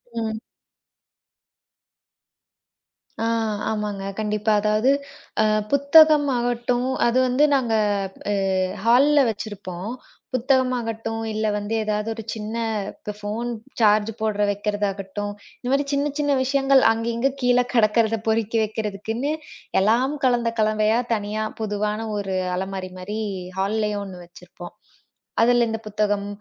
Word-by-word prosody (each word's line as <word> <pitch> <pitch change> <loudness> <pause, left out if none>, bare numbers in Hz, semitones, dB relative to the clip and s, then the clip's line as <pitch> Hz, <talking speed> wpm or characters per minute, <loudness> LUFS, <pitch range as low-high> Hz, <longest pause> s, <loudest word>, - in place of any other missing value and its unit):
ம். 220 -1 -2 2.8
ஆ, - - +1 0.5
ஆமாங்க, 210 -2 -3 0.2
கண்டிப்பா, 210 0 0
அதாவது 215 +5 +3 0.5
அ - - +3 0.3
புத்தகம் 290 +1 +6
ஆகட்டும், 245 +1 0 0.2
அது 240 +1 +1
வந்து 255 +4 +2
நாங்க 245 -4 0 0.6
அ - - +2 0.5
ஹால்ல 275 +6 +5
வச்சிருப்போம். 200 -3 -6 0.4
புத்தகம் 260 0 +2
ஆகட்டும், 225 -1 -4
இல்ல 215 0 -1
வந்து 205 +2 -4
எதாவது 210 +1 -1
ஒரு 225 - -7
சின்ன 220 0 -5 0.4
இப்ப 210 - -7
ஃபோன் 215 +3 -3 0.3
சார்ஜ் 215 0 +4
போடுறத 210 -1 0
வைக்கிறதாகட்டும், 205 0 -3 0.3
இந்தமாரி 275 +3 0
சின்ன, 285 +1 +1
சின்ன 290 -1 +1
விஷயங்கள் 270 0 +3
அங்கங்க 230 +3 0
கீழ 245 0 +4
கிடக்கிறத 225 -1 +3
பொறிக்கி 225 0 +1
வைக்கிறதுக்குன்னு 220 +5 -3 0.5
எல்லாம் 240 +7 +2
கலந்த 240 -2 +2
கலவையா 215 +1 +2
தனியா 215 0 -2 0.2
புதுவான 210 0 -1 0.2
ஒரு 195 -2 -3 0.2
அலமாரிமாரி 190 +2 -5 0.4
ஹால்லயும் 210 +1 0
1 180 -2 -9
வச்சிருப்போம். 175 0 -12 0.7
அதுல 240 +1 +4
இந்தப் 225 0 -5
புத்தகம், 205 -1 0
220 Hz, 110 wpm, -23 LUFS, 210-240 Hz, 2.8 s, புத்தகம்